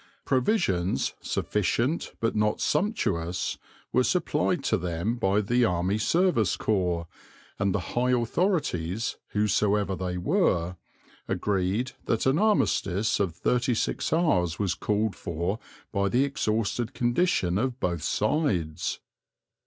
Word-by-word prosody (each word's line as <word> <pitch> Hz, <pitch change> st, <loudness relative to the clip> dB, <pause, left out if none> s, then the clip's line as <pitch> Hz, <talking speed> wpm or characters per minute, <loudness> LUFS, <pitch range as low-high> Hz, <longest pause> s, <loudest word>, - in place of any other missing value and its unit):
Provisions, 100 Hz, -, +1 dB
sufficient 115 Hz, -, -1 dB
but 115 Hz, -1 st, 0 dB
not 105 Hz, 0 st, +1 dB
sumptuous, 100 Hz, -, -1 dB, 0.3 s
were -, -, +4 dB
supplied -, -, +1 dB
to -, -, +2 dB
them 85 Hz, +5 st, -1 dB
by 105 Hz, -3 st, +2 dB
the 120 Hz, +4 st, +2 dB
Army 90 Hz, 0 st, +1 dB
Service 165 Hz, -, +2 dB
Corps, 90 Hz, -5 st, 0 dB, 0.5 s
and 100 Hz, -1 st, +2 dB
the 100 Hz, -, 0 dB
high 125 Hz, +1 st, +1 dB
authorities, 120 Hz, -, 0 dB, 0.2 s
whosoever 105 Hz, -1 st, +1 dB
they 90 Hz, -1 st, -3 dB
were, 90 Hz, -, +1 dB, 0.5 s
agreed 100 Hz, +5 st, 0 dB
that 115 Hz, -, 0 dB
an 135 Hz, +4 st, +3 dB
armistice 110 Hz, -, +2 dB
of 95 Hz, -5 st, 0 dB
thirty 125 Hz, +6 st, +1 dB
six -, -, -1 dB
hours 95 Hz, -, +2 dB
was 100 Hz, -3 st, 0 dB
called 105 Hz, 0 st, -1 dB
for 85 Hz, +4 st, -3 dB, 0.3 s
by 100 Hz, -1 st, +1 dB
the 125 Hz, +6 st, +3 dB
exhausted 115 Hz, -3 st, -1 dB
condition 120 Hz, -, +1 dB
of 130 Hz, +1 st, -1 dB
both 85 Hz, -6 st, -1 dB
sides. 95 Hz, -, 0 dB
105 Hz, 120 wpm, -27 LUFS, 90-125 Hz, 0.5 s, were